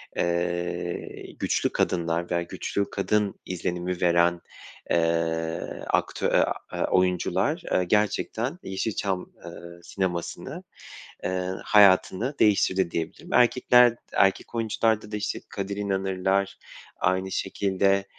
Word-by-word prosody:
eee, 85 0 -2
güçlü - - +1
kadınlar 85 0 -1
veya 85 -1 +1
güçlü 100 +3 -3
kadın 105 0 0
izlenimi 90 0 -3
veren, 85 0 +3 0.5
eee, 80 -1 -1
aktö - - 0
e - - +3
a - - +3 0.2
eee, - - -1
oyuncular, 90 -1 +1
eee, 90 - +3
gerçekten, 105 - 0
eee, - - -7
Yeşilçam, 95 -1 -2
eee, - - -7 0.3
sinemasını, 90 -3 -4 0.6
eee, 90 0 -1
hayatını 105 +5 +4
değiştirdi 95 -4 +3
diyebilirim. 80 -1 -5
Erkekler, 125 0 +5
d - - -28 0.2
erkek 95 +4 +2
oyuncularda 110 -1 0
da, 105 - -2
işte, 105 +1 -3
Kadir 100 0 -4
İnanırlar, 95 -1 0 0.4
aynı 95 +1 0
şekilde, 100 0 +1
95 Hz, 110 wpm, -26 LUFS, 85-100 Hz, 0.6 s, Erkekler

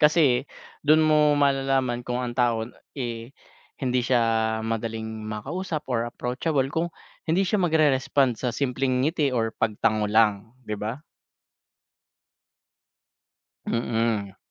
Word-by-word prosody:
Kasi 150 -4 +4 0.3
dun 155 +1 +4
mo 150 -1 +4
malalaman 135 -3 +1
kung 125 +1 -3
ang 120 - -3
tao, 120 -2 +1 0.3
eh, 120 0 -5 0.5
hindi 125 0 +1
siya 115 -3 +1
madaling 110 -1 -4
makausap 155 - -4
or 115 0 0
approachable, 130 +4 -1
kung 165 +1 0 0.4
hindi 180 +5 +3
siya 205 +2 +1
magre-respond 140 - +2
sa 125 - 0
simpleng 130 +1 0
ngiti 155 -2 +1
or 115 -3 -1
pagtango 105 0 0
lang, 110 +1 +2
'di 105 -1 -5
ba? 115 +8 -4 2.6
Mm. 115 -4 -1
125 Hz, 110 wpm, -25 LUFS, 115-145 Hz, 2.6 s, Kasi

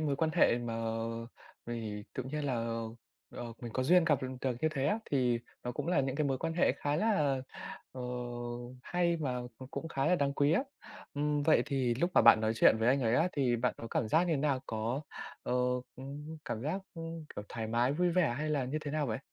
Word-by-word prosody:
mối 145 -3 0
quan 160 0 +1
hệ 120 -8 +5
mà 120 -1 -3 0.9
vì 110 -3 -4
tự 130 - -2
nhiên 145 +4 -3
là, 135 -3 0 0.8
ờ, - - -6 0.2
mình 120 -2 -5
có 130 - 0
duyên 175 +6 +5
gặp 150 -6 +2
được 130 - -2
được 130 -3 0
như 160 - +3
thế 140 -2 0
á, 205 +9 +2
thì 125 -4 +2 0.3
nó 125 - -2
cũng - - -4
là 180 - +3
những 135 0 -1
cái 150 - +1
mối 135 -2 0
quan 165 0 -2
hệ 170 - +4
khá 145 +2 -1
là, 150 -11 +2 0.5
ờ, 130 - -7 0.8
hay 170 +1 +1
và 130 -5 -2
c 130 +3 -12
cũng 165 - -4
khá 135 -3 0
là 180 - +5
đáng 140 -1 +1
quý 145 +2 +3
á. 215 - +3 0.5
Ừm, 145 0 +1
vậy 155 - +5
thì 130 -4 +1
lúc 170 +9 +1
mà - - +7
bạn - - +8
nói 110 0 +2
chuyện 110 - +6
với 115 +2 +2
anh 135 +2 +4
ấy 115 0 +3
á 170 - +3
thì 125 -4 +2
bạn 125 +2 0
có 115 - -7
cảm 110 - 0
giác 160 +9 +4
như 170 - +1
thế - - +2
nào? 140 -2 +1
Có, 115 +4 -1 0.4
ờ, - - -2 0.9
cảm 115 -7 -3
giác, 160 +8 -1
ơ, 165 - -6 0.3
kiểu, 105 - -4
thoải 115 -1 -4
mái, 120 +4 +2
vui 175 +4 +2
vẻ 170 -8 +2
hay 155 0 -1
là 145 -3 +1
như 135 +5 -2
thế 145 - -4
nào 150 -1 0
vậy? 110 -2 -2
140 Hz, 235 wpm, -32 LUFS, 120-155 Hz, 0.9 s, bạn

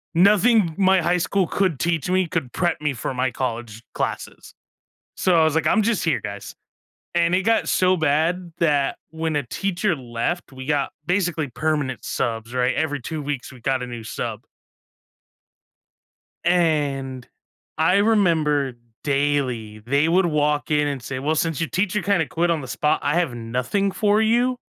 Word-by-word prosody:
nothing 205 -1 +4
my 190 -1 +4
high 175 +2 +2
school 185 +1 0
could 185 -8 0
teach 165 -4 0
me, 185 -1 +2
could 155 -6 -3
prep 175 -1 0
me 150 -2 0
for 125 - -4
my 130 0 0
college 115 -3 -4
classes. - - -4 0.6
So 175 -3 +3
I - - +5
was 155 -2 +2
like, 160 - +2
"I'm 220 - +3
just 225 -1 +1
here, 160 - +1
guys," 100 -1 -7 0.6
and 170 0 +2
it 190 - +2
got 225 +1 +2
so 185 0 +3
bad 165 +3 0
that 145 -4 +1
when 160 -1 -2
a 145 - +1
teacher 195 - -1
left, 125 +6 -3
we 130 0 -9
got 145 -2 0
basically 175 -5 0
permanent 130 -1 -2
subs, 115 -1 -3
right? 125 0 +1
Every 145 -2 -1
2 155 +4 -5
weeks, 140 -2 -4
we 125 - -14
got 130 0 0
a - - -4
new 120 -2 -7
sub. - - -4 2.0
And 145 -7 +1 0.5
I 165 +4 +4
remember 165 - +2 0.3
daily, 135 -7 -1
they 140 +7 +1
would 180 +2 +3
walk 150 -2 0
in 150 -1 +2
and 140 -4 -4
say, 130 +1 -4
"Well, 150 +4 0
since 160 -2 -1
your 165 - -1
teacher 200 +2 0
kinda 195 -6 +1
quit 170 +3 0
on 165 -2 +1
the 130 - -8
spot, 150 +4 0
I 145 +2 +1
have 170 -8 +1
nothing 125 - -1
for 210 0 +2
you. 240 +3 +2
155 Hz, 170 wpm, -22 LUFS, 130-180 Hz, 2.0 s, I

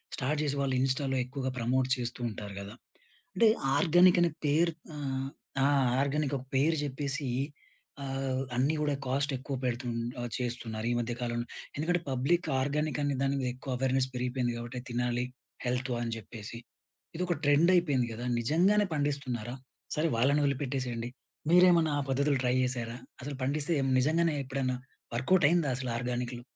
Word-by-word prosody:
Start 145 +3 -1
చేసి 145 -1 0
వాళ్ళు 135 -1 +1
ఇన్స్టాల్లో 135 0 +1
ఎక్కువగా 130 0 -3
ప్రమోట్ 125 +2 +1
చేస్తూ 120 0 -3
ఉంటారు 105 -2 -7
కదా! 100 +2 -8 0.6
అంటే 230 -1 +5 0.3
ఆర్గానిక్ 175 +1 +6
అనే 170 - +3 0.2
పేరు 165 +4 +3 0.2
ఆహ్, 135 -2 -2 0.4
ఆ! - - +5 0.3
ఆర్గానిక్ 140 0 0
ఒక 125 - -10
పేరు 155 +3 +3
చెప్పేసి 140 0 -2 0.8
ఆహ్, 135 -1 -1
అన్నీ 140 +5 +2
కూడా 145 -1 +1
కాస్ట్ 140 +2 +2
ఎక్కువ 135 +1 -5
పెడుతు 125 0 -1 0.4
ఆహ్, 120 - -4
చేస్తున్నారు. 115 -3 -3
ఈ - - +1
మధ్య 120 0 -2
కాలంలో. 120 0 -2 0.3
ఎందుకంటే 175 +4 +1
పబ్లిక్ 140 +7 +1
ఆర్గానిక్ 150 +2 0
అనే 140 -1 +1
దాని 140 0 +1
మీద 125 - -1
ఎక్కువ 130 0 -5
అవేర్‌నెస్ 130 0 +2
పెరిగిపోయింది. 125 -1 -1
కాబట్టి 120 +1 -5
తినాలి 120 0 0 0.4
హెల్త్ 125 +1 -1
అని 115 -1 -2
చెప్పేసి 110 +2 -8 0.6
ఇదొక 180 0 0
ట్రెండ్ 145 +5 +5
అయిపోయింది 145 -9 +3
కదా! 120 +2 -5 0.2
నిజంగానే 185 - +3
పండిస్తున్నారా? 135 -5 -2 0.4
సరే 155 +2 +1
వాళ్ళని 140 +5 +3
వదిలిపెట్టేసేయండి. 130 -4 -1 0.4
మీరేమైనా 175 -2 +6
ఆ - - +1
పద్ధతులు 140 +1 +2
ట్రై 125 0 +2
చేసారా? 120 -2 -2 0.2
అసలు 140 +1 -5
పండిస్తే 145 +4 +1 0.2
నిజంగానే 160 +5 +3
ఎప్పుడైనా 130 -1 -1 0.4
వర్క్‌ఔట్ 160 +8 +3
అయిందా 170 -4 +2
అసలు 130 -1 -3
ఆర్గానిక్‌లు? 120 0 -3
135 Hz, 150 wpm, -30 LUFS, 125-150 Hz, 0.8 s, ఆర్గానిక్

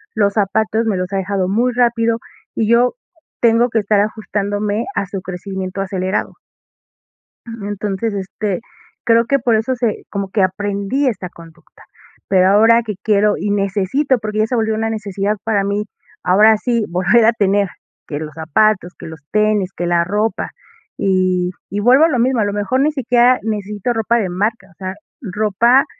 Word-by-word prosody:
los 205 -2 +2
zapatos 220 +2 0
me 205 -4 0
los 180 +1 -3
ha 195 - +1
dejado 190 -1 -1
muy 240 +5 +1
rápido, 230 -2 +1 0.4
y 220 - 0
yo 240 - +3 0.5
tengo 235 +1 +4
que 225 -1 +1
estar 205 0 +2
ajustándome 205 0 -2
a 200 - 0
su 195 0 -5
crecimiento 190 +1 -5
acelerado. 190 +1 -2 1.1
Eh, - - -10 0.2
entonces, 205 +1 -3
este, 195 +1 -3 0.4
creo 230 0 +3
que 275 +4 +1
por 235 -4 +2
eso 225 +4 0
se 235 -3 -2
como 200 -1 -4
que 195 -1 +1
aprendí 200 +7 -1
esta 195 -7 -2
conducta. 165 -1 -17 0.4
Pero 185 -1 +4
ahora 225 +3 +5
que 215 -2 -5
quiero 210 -1 +3
y 205 - -3
necesito, 205 +7 +1
porque 215 0 -3
ya 215 - +2
se 250 - -2
volvió 220 -1 0
una 225 +1 -1
necesidad 205 -1 -2
para 215 -3 +1
mí, 200 +1 -1 0.4
ahora 210 +4 +5
sí 235 -1 0
volver 185 +6 +3
a 230 - +5
tener, 200 -2 +2 0.4
que 145 - -4
los 155 -1 -7
zapatos, 180 +4 +1
que - - -9
los 160 -1 -10
tenis, 210 -3 +1
que 175 - -3
la 170 -1 +2
ropa. 210 +5 -1 0.5
Y 185 -2 +1 0.2
y 205 - -3
vuelvo 255 +8 +5
a - - +2
lo 255 -6 0
mismo, 250 +1 +2
a 210 - +2
lo 205 - -2
mejor, 205 +6 0
ni 305 +2 +2
siquiera 250 -2 +3
necesito 210 +1 -3
ropa 225 +1 +1
de 195 -5 -1
marca, 210 +6 -2
o - - -22
sea, 185 0 -5 0.3
ropa, 220 +5 +2
210 Hz, 180 wpm, -18 LUFS, 195-230 Hz, 1.1 s, ahora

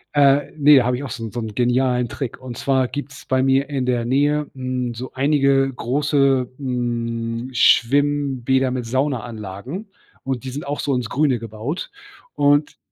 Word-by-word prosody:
Äh, 140 0 +4
ne, 145 -2 +7
habe 125 0 +1
ich 135 - -5
auch 140 - -5
so 120 -4 -6
'n 110 - -5
so 120 - -4
'n 110 -2 -5
genialen 125 +1 +1
Trick. 130 0 -5
Und 130 -2 -8
zwar 130 -2 +1
gibt 145 +1 -6
's 140 - -12
bei 130 0 +1
mir 135 +1 +2
in 135 -3 -1
der 120 -2 0
Nähe, 145 +4 +1
mhm, 130 -2 -3
so 125 +3 -7
einige 135 -1 +2
große, 135 0 +1
mhm, 120 -2 -3
Schwimmbäder 135 +1 +3
mit 125 -2 -3
Saunaanlagen. 120 - -3 0.3
Und 130 -2 -3
die 130 - -4
sind 145 +4 -6
auch 145 +1 -3
so 140 - 0
ins 120 -2 -2
Grüne 135 -3 +1
gebaut. 115 - -5 0.5
Und 145 +1 +2
130 Hz, 170 wpm, -21 LUFS, 120-140 Hz, 0.5 s, ne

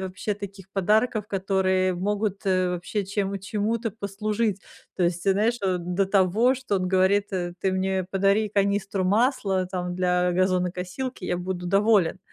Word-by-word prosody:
вообще 190 +2 -3
таких 195 -2 -10
подарков, 210 +3 +2
которые 190 -1 +1
могут, 200 +2 -2
э, 185 -1 +2
вообще 180 +3 -3
чем 200 0 -2
чему-то 215 +3 -2
послужить. 210 0 -2 0.3
То 180 - 0
есть, 175 0 0
те 195 - +3
знаешь, 225 +5 +1
до 180 0 0
того, 205 +6 +3
что 255 -6 -2
он 185 -1 -1
говорит, 190 +2 +3
э: 175 -2 -2
"Ты 190 -1 +1
мне 190 0 0
подари 200 +2 +2
канистру 200 -1 0
масла 200 -3 +1
там 180 -1 -4
для 180 0 +1
газонокосилки, 185 +5 -1
я 175 - 0
буду 180 0 -4
доволен". 195 -2 +3
195 Hz, 150 wpm, -25 LUFS, 185-205 Hz, 0.3 s, те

